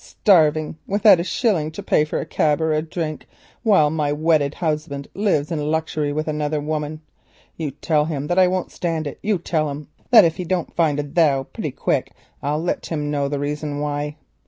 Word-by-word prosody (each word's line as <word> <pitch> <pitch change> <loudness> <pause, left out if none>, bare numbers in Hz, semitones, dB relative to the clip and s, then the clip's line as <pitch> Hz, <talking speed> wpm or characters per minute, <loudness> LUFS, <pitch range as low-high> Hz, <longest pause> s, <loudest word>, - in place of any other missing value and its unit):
"Starving 155 -5 +2
without 205 -2 +5
a - - 0
shilling 185 -6 0
to 160 - -8
pay 150 - +3
for 155 - -3
a - - -4
cab 150 -1 +1
or 160 -1 +1
a 155 - +1
drink 160 -1 -5 0.3
while 190 -10 +4
my 150 -2 0
wedded 150 -1 +1
husband 150 -4 -3
lives 185 -8 0
in 160 - -1
luxury 155 -2 -1
with 155 +2 -2
another 150 0 -1
woman. 155 +1 -3 0.5
You 160 -3 -3
tell 150 +2 0
him 145 -3 -3
that 175 +4 +1
I 185 - +6
won't 185 0 -2
stand 165 -3 -2
it; 145 - -6
you 205 -1 +1
tell 160 -3 -1
him 145 +1 -7 0.2
that 220 -6 +8
if 165 -1 0
he 180 - -3
don't 175 -1 -2
find 155 -4 +2
a - - 0
'thou.' 145 -2 +2
pretty - - -3
quick - - -1 0.3
I'll 150 +3 -1
let 175 - -2
him 150 -3 -2
know 140 -1 0
the 145 +1 -2
reason 145 +1 -3
why." 145 0 -3
155 Hz, 205 wpm, -21 LUFS, 150-170 Hz, 0.5 s, that